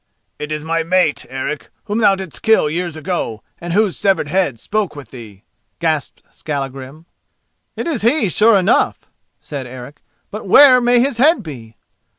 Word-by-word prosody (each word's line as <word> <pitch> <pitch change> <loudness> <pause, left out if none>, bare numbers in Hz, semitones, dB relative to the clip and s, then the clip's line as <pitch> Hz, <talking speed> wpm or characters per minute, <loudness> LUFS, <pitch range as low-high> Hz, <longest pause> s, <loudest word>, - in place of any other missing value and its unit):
"It 150 +1 -6
is 150 -1 -3
my 165 +1 -1
mate, 165 -2 +1
Eric, 135 +3 -5
whom 210 +1 -2
thou 200 -3 +4
didst 190 -5 -8
kill 220 -9 +3
years 170 0 -3
ago 155 - -4 0.2
and 175 0 -6
whose 205 0 +1
severed 190 -7 0
head 170 -9 0
spoke 205 - -2
with 140 -6 -10
thee!" 110 -6 -12 0.3
gasped 160 -4 -2
Skallagrim. 140 +1 -6 0.7
"It - - -4
is 315 -9 -2
he, 235 +1 +2
sure 210 +4 +4
enough!" 190 +3 +2 0.4
said 140 -4 -7
Eric; 130 +3 -11 0.3
"but 210 -1 -7
where 255 +4 +7
may 245 0 +3
his 260 0 0
head 295 +1 +4
be?" 120 -9 -10
170 Hz, 160 wpm, -18 LUFS, 140-215 Hz, 0.7 s, where